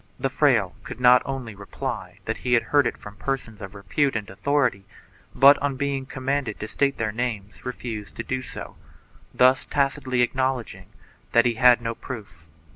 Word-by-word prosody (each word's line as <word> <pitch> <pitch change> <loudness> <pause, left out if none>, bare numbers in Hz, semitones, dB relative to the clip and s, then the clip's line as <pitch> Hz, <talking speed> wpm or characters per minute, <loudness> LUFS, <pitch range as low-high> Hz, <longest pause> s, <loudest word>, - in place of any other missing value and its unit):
The - - -1
fraile - - +3
could - - -8 0.3
only 135 -5 -5
reply 100 0 -6
that - - -2
he 125 - -1
had 120 - +4
heard 145 -1 +5
it - - -4
from 105 0 -11
persons 120 -5 -4
of 95 +1 -8
repute 135 +7 0
and 105 -3 -3
authority, 125 -3 0 0.5
but, 140 +1 +7
on 140 -1 -1
being 135 0 -2
commanded 135 -4 -2
to 110 - -4
state 140 +4 0
their 110 -1 -1
names, 110 -3 -4
refused 115 -4 -6
to 115 - -4
do 130 +1 -3
so, - - -9 0.5
thus 130 +1 +4
tacitly 135 -3 0
acknowledging 130 -1 -2 0.5
that 115 - +5
he 120 - +2
had 120 0 +5
no 115 0 -2
proof. 100 -10 -9
125 Hz, 170 wpm, -24 LUFS, 110-135 Hz, 0.5 s, but